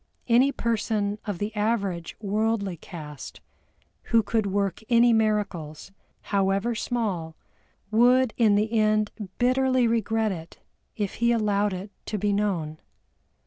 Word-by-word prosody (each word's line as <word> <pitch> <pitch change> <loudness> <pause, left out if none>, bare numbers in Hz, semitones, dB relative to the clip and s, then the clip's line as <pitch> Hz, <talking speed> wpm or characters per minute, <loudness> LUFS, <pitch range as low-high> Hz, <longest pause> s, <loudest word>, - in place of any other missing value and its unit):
Any 250 +3 +4
person 215 -4 -1
of 205 -4 -2
the 205 +4 -4
average 200 -6 -1
worldly 210 -2 -1
cast 150 -3 -9 0.7
who 230 -1 +3
could 220 -2 0
work 200 -1 -1
any 235 0 +5
miracles, 205 -8 -1 0.3
however 200 +3 0
small, 200 -9 -2 0.6
would 245 +2 +4
in 220 -4 +4
the 215 +2 0
end 215 -1 +2 0.3
bitterly 255 0 +2
regret 225 -1 +1
it 165 -2 -8 0.4
if 205 -3 -2
he 235 0 +4
allowed 210 -3 +1
it 190 +3 -6 0.2
to 215 - -2
be 205 +1 0
known. 175 -7 -1
210 Hz, 125 wpm, -26 LUFS, 195-230 Hz, 0.7 s, any